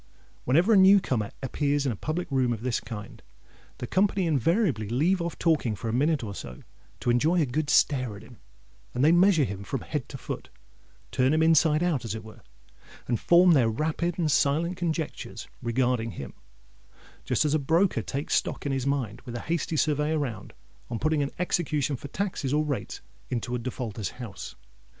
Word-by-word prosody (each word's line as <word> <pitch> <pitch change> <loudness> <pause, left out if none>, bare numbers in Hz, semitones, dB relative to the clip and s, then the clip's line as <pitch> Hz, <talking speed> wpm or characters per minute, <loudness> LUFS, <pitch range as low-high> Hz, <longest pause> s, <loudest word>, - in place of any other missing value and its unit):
Whenever 170 - +4
a - - +6
new 195 +1 +7
comer 110 - -2
appears 145 +2 0
in 135 - +1
a - - -3
public 155 - -3
room 130 -3 +2
of 110 0 -7
this 125 -2 0
kind, 110 -2 -9 0.6
the - - -5
company 190 - +1
invariably 155 - +1
leave 165 +10 +2
off 170 0 -4
talking 155 -10 +1
for 115 - -5
a - - -2
minute 145 +2 +1
or 100 -2 -5
so, 65 -9 -9 0.4
to 120 - +1
enjoy 155 +9 +3
a 155 - +3
good 145 +3 -2
stare 130 -9 +2
at 100 - -11
him; 115 0 -15 0.6
and 125 +3 +2
they 155 - +6
measure 175 -2 +5
him 100 -5 -4
from - - -4
head - - -4
to - - -7
foot—turn 60 - -4
him 160 - +3
inside 160 0 +4
out, 165 -8 0
as 110 -2 -4
it 110 - -7
were—and 65 - -9
form 175 +1 +6
their 130 -8 +4
rapid 160 +8 -1
and 160 -4 +1
silent 160 +6 +2
conjectures 165 -3 -4
regarding 120 -1 0
him, 70 - -8 0.9
just - - +1
as 150 - +1
a 155 - +3
broker 160 - +2
"takes 140 +6 -3
stock" - - 0
in 140 - 0
his 135 0 -1
mind, 125 -6 -2
with 120 -2 -8
a 120 - -4
hasty 165 -1 -2
survey 150 +1 +1
around, 140 -9 -3 0.4
on 120 - -3
putting 155 +3 +1
an 140 - -1
execution 150 -5 0
for 135 - -8
taxes 175 -5 -3
or 150 +1 +2
rates 145 -3 -4 0.3
into 120 0 -3
a 125 - -1
defaulter's 115 -4 -4
house. 120 -6 -8
140 Hz, 185 wpm, -27 LUFS, 115-160 Hz, 0.9 s, new